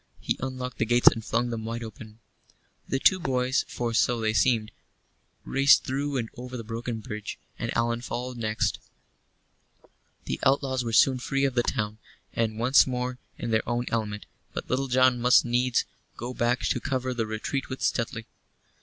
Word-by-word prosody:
He - - -1
unlocked 130 -1 -5
the 115 - +2
gates 120 +2 +3
and 115 - -6
flung 120 +3 0
them 115 -1 -4
wide 115 +1 -4
open. 110 0 -10 0.7
The 135 - 0
two 185 +7 +4
boys 130 -4 0
for 120 -1 -3
so 120 +1 +2
they 110 -1 0
seemed 110 -3 +2 0.7
raced 135 +1 +5
through 140 +1 -2
and 115 -3 -1
over 125 +1 -7
the 115 - -6
broken 115 0 -4
bridge, 105 -3 -6 0.2
and - - -2
Allan 115 0 0
followed 125 0 -5
next. 110 -1 -1 1.5
The - - -3
outlaws 135 -1 +2
were 115 - -3
soon 130 +3 +5
free 135 +2 0
of 135 - 0
the 120 - +3
town, 110 -2 -2 0.3
and 110 -2 -1
once 125 +5 +5
more 125 0 -3 0.2
in 120 - -4
their 110 +1 +1
own 120 +1 0
element, 105 -2 -2 0.3
but - - -5
Little 135 +2 +1
John 130 -1 +3
must 125 +1 +6
needs 120 +1 +1 0.3
go 120 +2 -5
back 120 +1 +1
to - - 0
cover 130 -2 -2
the 115 -3 -2
retreat 110 +5 -3
with 130 - -6
Stuteley. 115 -1 -1
120 Hz, 175 wpm, -27 LUFS, 115-130 Hz, 1.5 s, must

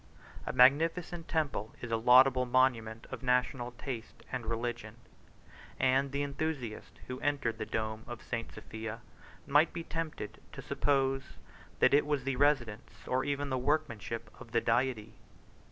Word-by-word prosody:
A - - 0
magnificent 165 +6 +3
temple 145 -9 -1
is 120 - -6
a - - +3
laudable 125 +2 +6
monument 120 -3 +2
of - - -5
national 125 -1 0
taste 120 -2 -7
and 125 -3 -4
religion; 120 +1 -3 0.8
and 135 +1 +3
the 140 +1 -1
enthusiast 140 -5 -4
who 125 0 -6
entered 140 -6 -1
the 110 - -3
dome 110 0 -3
of 120 -2 -8
St. 115 -2 -4
Sophia 110 +1 -7 0.4
might 145 +4 +4
be 170 - -4
tempted 165 -11 -5
to - - -7
suppose 135 -1 0 0.4
that - - +4
it 145 +1 +4
was 145 -3 0
the 135 0 -1
residence, 130 -5 0
or 130 +1 +1
even 145 0 -2
the 130 - 0
workmanship, 115 -6 -2
of 120 -3 -12
the 115 - +3
Deity. 115 -2 0
130 Hz, 150 wpm, -32 LUFS, 115-140 Hz, 0.8 s, laudable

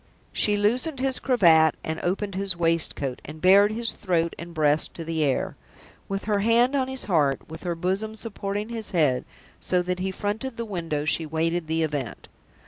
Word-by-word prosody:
She 210 -1 +2
loosened 250 +8 0
his 265 -1 0
cravat 165 - +4
and 160 0 -3
opened 195 +3 -1
his 190 -2 -1
waistcoat, 165 -6 0
and 155 +2 -9
bared 200 +4 +6
his 230 +1 +1
throat 170 -3 -1
and 170 0 -7
breast 155 -2 +1
to 165 - -6
the 160 -1 -1
air. 140 -3 0 0.5
With 195 0 -3
her 205 -1 +1
hand 230 +5 +3
on 265 -2 +1
his 265 0 -3
heart, 150 -8 +1
with 160 +1 -9
her 175 -2 -2
bosom 190 +6 -2
supporting 205 -1 -4
his 225 -2 -3
head, 135 -6 +2 0.3
so 180 -1 +1
that 180 0 -2
he 190 +1 -1
fronted 210 +6 -4
the 230 - -3
window, 165 -7 -3
she 160 +1 +1
waited 165 +2 -1
the 160 +1 0
event. 145 -6 -4
180 Hz, 185 wpm, -25 LUFS, 160-210 Hz, 0.5 s, bared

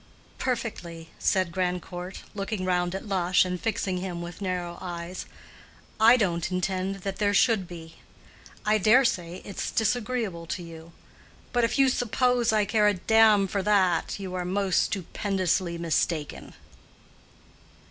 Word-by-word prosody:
"Perfectly," 180 -10 -4
said 185 -3 +1
Grandcourt, 180 0 -4
looking 200 -1 -3
round 180 0 0
at 190 - -5
Lush 180 -2 +2
and 180 -1 -4
fixing 195 -4 -1
him 180 -1 -4
with 170 +2 -8
narrow 180 -2 -3
eyes; 175 0 -6 0.7
"I 230 +3 +7
don't 175 -5 0
intend 185 +1 -2
that 195 +1 -4
there 205 -1 +1
should 205 -3 +3
be. 165 -2 -10 0.7
I 215 0 +3
dare 235 +7 +5
say 175 -4 -2
it's 200 - -4
disagreeable 220 -6 -1
to 175 - -4
you. 165 0 -11 0.6
But 240 -1 +3
if 230 - -1
you 270 -1 +5
suppose 245 -1 +2
I 215 -1 +2
care 210 +1 +3
a 205 - +3
damn 215 0 +4
for 200 +1 -1
that 190 -3 +2
you 190 -2 -6
are 180 -1 -2
most 190 +1 +1
stupendously 185 -2 -1
mistaken." 165 -2 -2
185 Hz, 140 wpm, -26 LUFS, 175-210 Hz, 0.7 s, I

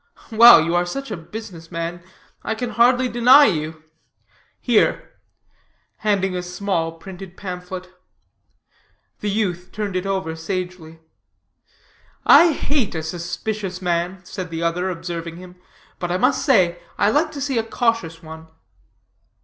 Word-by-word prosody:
"Well, 225 -6 +9
you 170 - -1
are 175 0 +1
such 275 +6 -5
a - - -2
business 170 -1 -10
man, 170 +1 -4 0.4
I 220 - -3
can 245 +1 -4
hardly 245 +2 +3
deny 250 +4 +6
you. 155 -4 -2 0.8
Here," 240 -4 +1 0.9
handing 195 -3 0
a 180 - -2
small, 180 -2 -2
printed 190 +2 -11
pamphlet. 185 -1 -7 1.3
The 210 - -2
youth 185 -4 -2
turned 205 -2 -4
it 185 +1 -2
over 190 -4 -2
sagely. 165 -1 -6 1.2
"I 340 -1 +8
hate 280 - -1
a 160 - -3
suspicious 180 +4 -4
man," 180 +1 -2
said 185 -1 -6
the 165 0 -4
other, 175 +2 0
observing 165 -1 -5
him; 180 0 -12 0.4
"but 175 -1 -3
I 180 - +1
must - - +2
say 180 - +3 0.2
I 205 - +3
like 310 +4 +1
to 285 - -6
see 270 -4 0
a - - 0
cautious 225 -8 -1
one." 160 0 -10
185 Hz, 140 wpm, -21 LUFS, 170-220 Hz, 1.3 s, Well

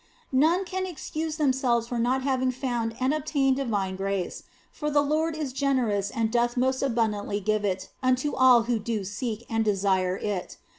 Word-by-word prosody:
None 325 +8 +3
can 375 +1 -3
excuse 315 -2 -4
themselves 260 -6 +1
for 240 0 -3
not 255 +3 +1
having 260 -1 +1
found 240 -3 -2
and 260 +3 +2
obtained 275 -3 +1
divine 200 -8 -1
mercy, 195 -2 -2 0.3
for 300 - -3
the 290 -1 +3
Lord 310 +2 0
is 290 -5 -3
generous 250 -8 +1
and 225 0 -1
doth 240 +1 +1
most 260 +1 +1
abundantly 220 -5 0
give 215 +1 0
it 190 -2 -2
unto 255 +3 +1
all 255 -2 +6
who 235 -1 0
do 215 -1 -2
seek 220 +3 -4
and 225 -1 0
desire 190 -3 +1
it. 200 -4 -4
245 Hz, 170 wpm, -26 LUFS, 210-275 Hz, 0.3 s, all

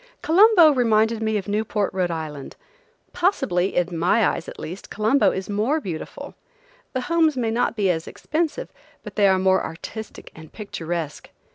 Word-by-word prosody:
Colombo 355 -1 +6
reminded 225 -3 +2
me 220 -1 0
of 200 - -5
Newport, 210 -1 -1
R. 180 -2 0
I. 155 -4 -5 0.6
Possibly–in 180 - 0
my 180 +6 +3
eyes, 170 - -5
at - - -11
least–Colombo 215 - 0
is 190 0 -4
more 220 +10 0
beautiful. 175 - -7 0.6
The 255 - -1
homes 320 0 +2
may 230 -3 0
not 235 0 0
be 200 -4 +2
as 160 -1 -4
expensive, 315 0 -3 0.3
but - - -10
they 205 -2 +4
are 190 -1 +4
more 190 0 +2
artistic 215 +6 -8
and 160 -1 -13
picturesque. 170 -7 -5
210 Hz, 150 wpm, -23 LUFS, 180-250 Hz, 0.6 s, Colombo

